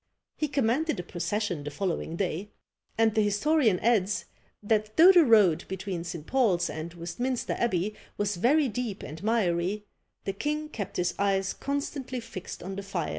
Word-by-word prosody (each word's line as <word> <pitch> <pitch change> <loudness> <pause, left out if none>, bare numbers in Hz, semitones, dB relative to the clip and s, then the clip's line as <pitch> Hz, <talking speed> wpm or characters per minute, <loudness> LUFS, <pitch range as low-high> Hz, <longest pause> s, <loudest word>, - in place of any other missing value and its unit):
He 305 - -1
commanded 280 - +1
a - - -3
procession 175 -1 -2
the 150 - -4
following 165 +1 -2
day; 190 +2 -2 0.5
and 225 -1 +4
the 215 - +3
historian 210 - +2
adds, 210 -3 +2 0.4
that 215 0 0
though 345 +4 +10
the 355 -3 +7
road 205 - +5
between 190 -2 -4
St. 170 -3 -6
Paul's 190 -10 +2
and 160 +2 -5
Westminster 240 +10 -2
Abbey 210 -3 0 0.2
was 205 -2 -1
very 280 - +4
deep 230 -3 -4
and 155 +2 -8
miry, 205 -2 0 0.4
the 195 - -2
king 300 +8 -2
kept 205 -10 -5
his 180 0 +1
eyes 195 -1 +1
constantly 280 -2 -3
fixed 190 -5 -8
on 190 +2 -5
the - - -3
phial. 190 -5 -3
205 Hz, 165 wpm, -28 LUFS, 180-245 Hz, 0.5 s, though